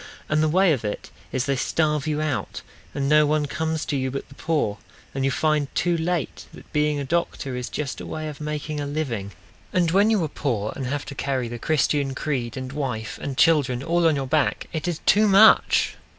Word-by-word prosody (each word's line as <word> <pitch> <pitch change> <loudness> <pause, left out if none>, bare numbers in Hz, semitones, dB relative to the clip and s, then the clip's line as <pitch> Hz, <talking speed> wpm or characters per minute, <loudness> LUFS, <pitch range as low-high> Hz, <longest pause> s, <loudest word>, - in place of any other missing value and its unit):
And 155 0 +2
the 155 - +2
way 185 +1 +4
of 130 - -3
it 105 -1 -5 0.2
is 130 -1 -1
they 140 - +1
starve 150 +2 0
you 155 0 0
out. 155 -2 -3 0.3
And 140 -1 -1
no 150 +1 +5
one 150 0 +1
comes 160 +2 -2
to 145 - -2
you 130 -1 -1
but 135 +1 -6
the - - -13
poor. 140 -9 -1 0.3
And 135 - -2
you 135 - +3
find 155 0 +1
too 175 0 +2
late 170 -1 -2
that - - -15
being 150 -1 +1
a - - -2
doctor 140 -3 -2
Is 125 -1 -4
just 145 -3 -4
a - - -7
way 155 0 -4
of 150 0 -8
making 150 0 -4
a 145 - -3
living. 125 -10 -3 0.4
And 175 -3 +2
when 200 +4 +4
you 215 -6 +2
are - - 0
poor 115 -8 -2
and 135 -3 -4
have 145 +2 -3
to - - -7
carry 135 -3 -2
The 120 0 -6
Christian 145 -1 +1
creed 130 -5 -3
and 130 0 -5
wife 125 -6 -4
and 135 -2 -4
children 145 -6 +3
All 170 +1 +2
on 160 - +3
your 135 -1 -2
back, 150 +3 +1
it 160 +1 -3
is 170 -3 -2
too 210 +1 +5
much! 205 +2 +6
150 Hz, 220 wpm, -24 LUFS, 135-160 Hz, 0.4 s, much